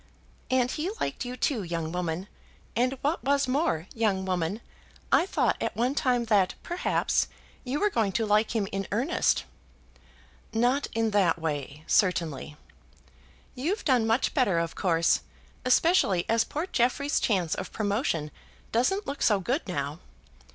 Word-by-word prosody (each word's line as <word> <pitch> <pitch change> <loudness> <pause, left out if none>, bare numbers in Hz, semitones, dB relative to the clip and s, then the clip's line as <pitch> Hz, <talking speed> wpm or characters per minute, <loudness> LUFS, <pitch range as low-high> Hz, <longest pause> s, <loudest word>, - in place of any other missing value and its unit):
"And 255 -1 +2
he 325 +4 -2
liked - - -2
you 250 +1 -5
too, 245 -2 0
young 165 -3 -3
woman; 180 +1 -3 0.5
and, 255 +4 +1
what 295 +4 0
was 280 0 +2
more, 255 - 0
young 205 -4 0
woman, 185 +3 -1 0.5
I 350 - +4
thought - - +1
at - - -2
one 245 +4 +1
time 250 -4 +1
that, 200 -4 +2
perhaps, 350 +1 0 0.4
you 265 +3 -2
were 415 0 +2
going 220 - +1
to 225 - +1
like 215 +2 +2
him 205 -3 +1
in 195 0 -3
earnest." 255 - +1 1.1
"Not 245 +5 +2
in 225 -1 +1
that 190 -6 +3
way, 150 -2 -4
certainly." 165 -7 +1 1.0
"You've 330 - -2
done 250 -6 +3
much 225 +4 +1
better, 245 - +2
of 165 -1 -1
course; 165 -3 +2 0.4
especially 255 - +3
as 230 0 +2
poor 310 +4 -3
Jeffrey's 280 -1 +1
chance 185 -7 +1
of 185 - -5
promotion 205 - -1 0.4
doesn't 385 - +1
look 280 +1 -5
so 210 -3 +4
good 250 - -1
now. 145 -2 -3
225 Hz, 150 wpm, -27 LUFS, 180-260 Hz, 1.1 s, I